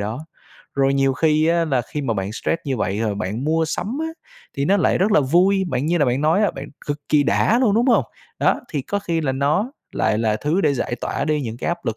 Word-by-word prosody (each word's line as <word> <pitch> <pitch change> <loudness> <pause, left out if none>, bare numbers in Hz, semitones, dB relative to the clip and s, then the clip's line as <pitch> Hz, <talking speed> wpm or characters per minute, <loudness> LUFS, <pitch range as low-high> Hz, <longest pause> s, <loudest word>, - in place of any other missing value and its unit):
đó. 110 +9 -5 0.5
Rồi 135 0 +2
nhiều 135 -1 +2
khi 155 +1 +2
á, 170 0 +2
là 135 -6 0
khi 150 - -2
mà 115 -5 -1
bạn 95 +1 -3
stress 165 - -1
như 135 -3 -1
vậy 105 -1 -1
rồi 110 -2 0
bạn 105 +5 -3
mua 160 +2 +1
sắm 200 - -3
á, 320 - -1 0.5
thì 140 - 0
nó 195 +6 +3
lại 190 - +2
rất 205 +3 +2
là - - +5
vui, 180 +8 +3
bạn 130 0 -1
như 175 +2 +1
là 145 - +3
bạn 125 +1 0
nói 160 +7 +3
á, 205 - +3
bạn 135 +2 -8 0.2
cực 145 0 -2
kỳ 150 -1 +4
đã 225 - +2
luôn, 215 -6 +3
đúng 235 +3 +2
hông? 250 - +4 0.3
Đó, - - +2
thì 145 -3 -3
có 205 - -2
khi 170 -4 -2
là 140 -4 -1
nó 150 - 0 0.2
lại 105 - +1
là 110 -2 +1
thứ 150 - 0
để 145 -7 +2
giải 120 -1 -2
tỏa - - -2
đi 155 -1 0
những 115 -3 -5
cái - - -4
áp 170 0 -3
lực 115 -1 -1
150 Hz, 265 wpm, -21 LUFS, 130-170 Hz, 0.5 s, là